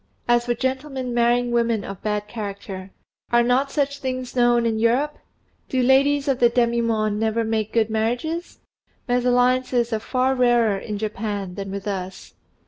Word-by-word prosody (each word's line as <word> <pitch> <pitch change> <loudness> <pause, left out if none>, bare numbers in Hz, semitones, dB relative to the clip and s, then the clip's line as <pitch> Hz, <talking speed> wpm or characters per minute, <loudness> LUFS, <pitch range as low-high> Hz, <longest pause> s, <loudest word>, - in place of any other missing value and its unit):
As 240 0 +3
for 240 - +1
gentlemen 260 0 -3
marrying 240 +1 +2
women 235 -3 +1
of 195 -2 -8
bad 210 -1 -2
character, 200 -3 -6 0.4
are 240 0 +5
not 255 +3 +2
such 280 -1 -1
things 255 -2 -4
known 240 -1 +3
in 225 -1 0
Europe? 255 +7 +1 0.5
Do 260 - 0
ladies 275 +3 +3
of 265 -2 +1
the 240 - +5
demi 235 -1 +1
monde 215 -2 0
never 225 +1 0
make 220 -1 -1
good 225 -1 +1
marriages? 245 +10 -2 0.5
Mésalliances 245 -1 +2
are 220 - 0
far 255 +4 0
rarer 240 -5 +3
in 210 +1 -5
Japan 205 -3 -4
than 195 +1 -6
with 200 +1 -6
us. 190 -2 -5
235 Hz, 160 wpm, -22 LUFS, 215-255 Hz, 0.5 s, are